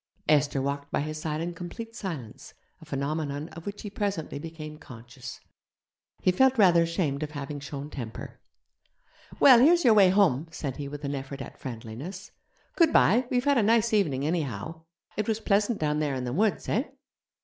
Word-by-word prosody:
Esther 145 -2 +3
walked 140 +1 -3
by - - 0
his 155 +1 -4
side 155 0 -2
in 175 +1 -3
complete 225 +7 -8
silence, 165 - -7 0.3
a - - -12
phenomenon 145 +2 -3
of 165 +2 -11
which 205 0 -6
he 205 - -5
presently 195 -8 -3
became 155 -1 -8
conscious. 120 0 -10 0.8
He 185 - +5
felt 265 +7 +3
rather 180 -5 +6
ashamed 165 -4 -1
of 155 - -3
having 145 0 -5
shown 140 +1 -7
temper. 115 -5 -7 1.0
'Well, 255 -4 +8
here's 335 +5 +5
your 230 - +7
way 200 -3 +7
home,' 175 -7 +3
said 145 -4 -5
he 145 -2 -5
with 145 +1 -7
an 140 - -2
effort 135 0 -6
at 135 - -9
friendliness. 130 - -7 0.4
'Goodbye; 255 - +4
we've 250 +1 0
had 285 -3 +4
a - - +4
nice 225 +1 +3
evening 145 -10 +1
anyhow. 155 - -3 0.4
It 215 - -1
was 220 -1 0
pleasant 210 +1 +1
down 150 -1 0
there 145 -3 0
in 130 - -3
the 125 -1 -3
woods, 210 +6 +1
eh?' 240 +7 +1
155 Hz, 180 wpm, -27 LUFS, 140-205 Hz, 1.0 s, Well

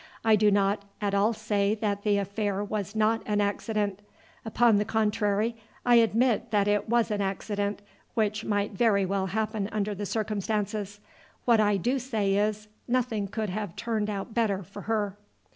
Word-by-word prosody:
I 220 -1 +6
do 210 0 +4
not 200 0 +2 0.2
at 205 -1 -1
all 200 +3 +3
say 210 -2 0
that 205 -2 -2
the 205 -1 +2
affair 200 0 -1
was 205 0 -4
not 220 +1 +2
an 210 -1 +1
accident. 205 -1 -1 0.4
Upon 225 0 +3
the 205 - +2
contrary, 215 0 0 0.3
I 240 -1 +6
admit 230 0 +2
that 205 -2 +2
it 205 +1 +1
was 235 -1 +2
an 205 -1 0
accident 205 +1 -2 0.3
which 215 -1 0
might 205 -1 0
very 200 -1 +2
well 190 0 -1
happen 215 0 -2
under 210 -1 -1
the 205 +1 -4
circumstances. 210 -1 -2 0.4
What 235 -2 +5
I 205 -1 +3
do 250 +8 0
say 220 -6 0
is, 210 +1 0 0.2
nothing 240 -5 0
could 215 0 -3
have 205 -3 -4
turned 220 -2 -2
out 200 +2 -4
better 205 -4 +1
for 200 +3 -10
her." 205 -3 0
210 Hz, 170 wpm, -27 LUFS, 200-220 Hz, 0.4 s, I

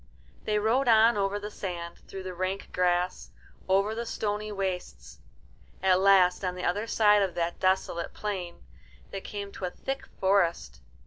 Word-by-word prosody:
They 210 - +1
rode 230 +6 +2
on 225 0 +6
over 200 0 0
the 205 +1 -6
sand, 170 -4 -6
through 190 -1 -7
the 185 0 -5
rank 185 +2 -3
grass, 180 0 0 0.4
over 195 +3 +3
the 235 +1 -4
stony 210 0 -2
wastes. 180 - -5 0.6
At 185 -1 +4
last, 190 -1 +5
on 180 -1 -1
the 180 - -4
other 205 +5 0
side 210 -2 +4
of 190 -3 -1
that 170 0 -2
desolate 185 -2 0
plain, 185 - -5 0.5
they 195 - -5
came 200 0 -6
to 190 - -5
a - - -1
thick 270 +9 -5
forest. 170 - +1
195 Hz, 165 wpm, -28 LUFS, 180-210 Hz, 0.6 s, on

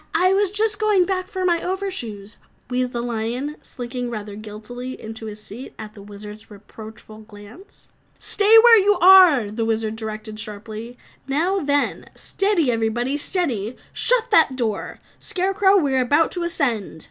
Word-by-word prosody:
"I 370 +1 +4
was 400 0 +2
just 420 +1 0
going 420 -4 +3
back 370 0 -2
for 375 -2 -3
my 340 -2 +2
over 380 +2 -3
shoes," 215 - -6 0.3
wheezed 250 0 -1
the 240 - -3
lion, 240 +5 -3
slinking 245 0 -6
rather 210 -3 -6
guiltily 220 +4 -8
into 220 0 -7
his 210 0 -8
seat 215 +5 -11
at 215 -1 -9
the 205 - -13
Wizard's 210 +1 -11
reproachful 215 +1 -12
glance. 215 - -15 0.3
"Stay 420 +2 +4
where 465 -2 +8
you 405 0 +3
are!" 355 - +7
the 225 +2 -3
Wizard 220 -1 -1
directed 215 -1 -6
sharply. 220 +2 -7 0.3
"Now 340 +8 0
then, 285 -3 -1
steady 390 -9 0
everybody 235 +4 -1
steady! 260 - -1 0.2
Shut - - +1
that 260 - +4
door, 225 -5 -3 0.2
Scarecrow, 385 +1 +2
we 285 -7 +1
are 260 - +3
about 290 +6 +2
to 355 - -3
ascend." 250 - -1
245 Hz, 160 wpm, -21 LUFS, 220-365 Hz, 0.3 s, where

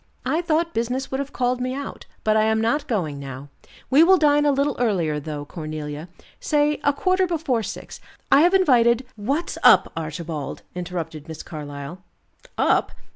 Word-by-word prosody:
"I 320 - +1
thought 335 0 0
business 245 +4 -2
would 265 - -1
have 280 0 -4
called 250 0 0
me 255 +1 -2
out, 280 0 -7 0.2
but 215 0 +2
I 215 0 +4
am 220 0 +2
not 280 +7 0
going 160 - -2
now. 135 0 -8 0.4
We 280 +4 +7
will 375 +2 +6
dine 295 -2 +4
a - - +5
little 280 0 +1
earlier, 175 -11 +1
though, 150 -1 -6
Cornelia, 155 0 -6 0.3
say 295 0 +1
a 285 - +4
quarter 370 +5 +1
before 310 -9 0
six. 210 - -7 0.3
I 280 - +7
have 355 +4 +4
invited 250 -8 +4
" - - -36
"What's 320 +5 -1
up, - - +6
Archibald?" 160 -2 -5
interrupted 170 -4 -5
Miss 160 -1 -7
Carlyle. 145 +2 -8 0.6
"Up! - - +2
235 Hz, 175 wpm, -23 LUFS, -, 0.6 s, We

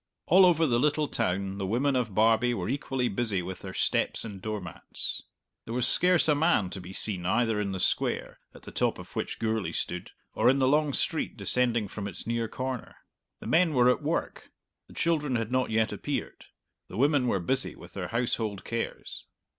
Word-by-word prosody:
All 185 +2 +7
over 165 -2 +4
the 120 -5 +2
little 150 +2 +2
town 95 -1 -1
the 95 - -2
women 130 +7 +1
of 115 -6 -1
Barbie 115 +3 +3
were - - -3
equally 135 -2 -1
busy 110 -8 -1
with 95 +1 -6
their 95 -1 -8
steps - - 0
and 100 -4 -8
door 110 +1 -3
mats. 90 -4 -5 0.4
There 115 - -5
was 125 0 +2
scarce 180 -2 +4
a 150 - +5
man 145 - +2
to 95 - -6
be 90 +1 -9
seen 95 -2 -2
either 115 0 +2
in 100 -1 -2
the 95 - -4
Square, - - -1 0.2
at - - -14
the - - -9
top - - 0
of - - -12
which - - -3
Gourlay 110 -2 -1
stood, 90 0 -3 0.2
or 115 +3 +4
in 135 - +4
the 130 -1 +3
long 150 +1 +3
street 160 - -1
descending 120 -4 +1
from 100 +1 -5
its 95 - -7
near 115 0 -1
corner. 130 +2 -5 0.5
The - - -9
men 165 -2 +3
were 125 0 +5
at - - -1
work; - - -3 0.4
the - - -16
children 150 -6 +1
had 115 0 -2
not 130 0 +1
yet 110 0 +1
appeared; - - -4 0.4
the 95 - -8
women 140 0 +3
were 100 - +1
busy 130 +10 0
with - - -13
their - - -4
household 115 -3 -1
cares. 115 0 -5
120 Hz, 200 wpm, -28 LUFS, 105-135 Hz, 0.5 s, All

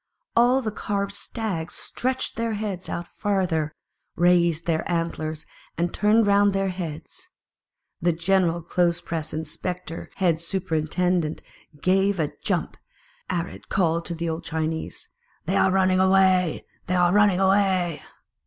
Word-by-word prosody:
All 250 +3 +4
the 215 - -2
carved 200 -1 -2
stags 200 -6 -4
stretched 260 +1 -3
their 230 -1 -1
heads 205 -4 -4
out 170 0 -4
farther, 180 -7 -1 0.4
raised 170 -2 +3
their 160 -2 +1
antlers, 160 -2 -2 0.3
and 175 0 0
turned 215 +2 +4
round 200 0 +4
their 195 0 +1
heads. 180 - -7 0.7
The 175 - +3
Gen 180 +3 +2
109 - - -3
unit 170 -1 -8
eral - - -33
clothes 175 -1 +1
press 165 -3 -4
inspec 165 +3 -4
tor 165 - -7
head 175 -4 +2
superinten 175 0 0
dent 155 0 -5 0.4
gave 195 +1 +3
a 150 -2 0
jump, - - -1 0.5
arid 175 -1 -4
called 170 -3 +1
to 170 - -3
the 170 +1 -3
old 165 +1 -3
Chinese, 160 0 -3 0.2
" - - -38
They - - 0
are - - +4
running 185 0 +3
away! 190 -2 +3 0.2
they 185 - +1
are 175 0 +4
running 205 -3 +4
away 190 -5 +2
180 Hz, 155 wpm, -24 LUFS, 165-195 Hz, 0.7 s, All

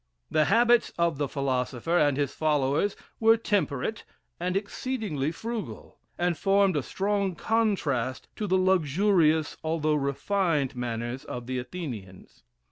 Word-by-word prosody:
The 155 -1 +3
habits 235 +7 +4
of 170 -4 +1
the 145 - 0
philosopher 130 +3 -1
and 145 -5 +3
his 145 -2 -1
followers 150 +4 +1 0.2
were 225 0 +5
temperate 205 - -1 0.4
and 180 +2 0
exceedingly 200 - -2
frugal, 225 +5 -6 0.2
and 175 0 +1
formed 195 0 +3
a 145 - +1
strong 195 +4 -1
contrast 165 - 0
to 210 - -2
the 185 0 +3
luxurious, 175 -3 +2
although 155 -1 0
refined, 150 +1 0
manners 120 +1 -4
of 120 -1 -6
the 130 +1 -2
Athenians. 120 - -8
160 Hz, 125 wpm, -27 LUFS, 135-200 Hz, 0.4 s, were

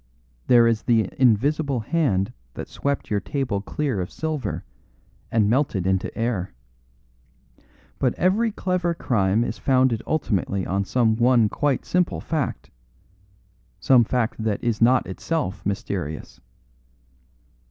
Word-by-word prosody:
There 120 -2 +6
is 115 -2 +2
the 115 -5 +2
invisible 135 +3 +2
hand 120 - 0 0.2
that - - -6
swept 140 -4 -3
your 105 - +2
table 115 -2 -2
clear 130 -3 -2
of 90 - -4
silver 150 -9 -4 0.7
and 110 -2 +3
melted 115 -6 +1
into 95 0 0
air. 110 - -2 1.4
But 130 -3 +1
every 215 +5 +2
clever 180 -3 -1
crime 105 -6 +1
is - - -4
founded 130 -4 +2
ultimately 100 - -1
on 100 +2 -1
some 110 -1 +2
one 120 -2 +4
quite 145 +1 -1
simple 180 -1 0
fact 155 -4 -3 1.1
some 125 -3 +5
fact 115 -1 -1
that 110 -2 -1
is 115 -3 -1
not 125 +2 +4
itself 105 - -3
mysterious. 90 -9 -4
120 Hz, 120 wpm, -23 LUFS, 100-140 Hz, 1.4 s, There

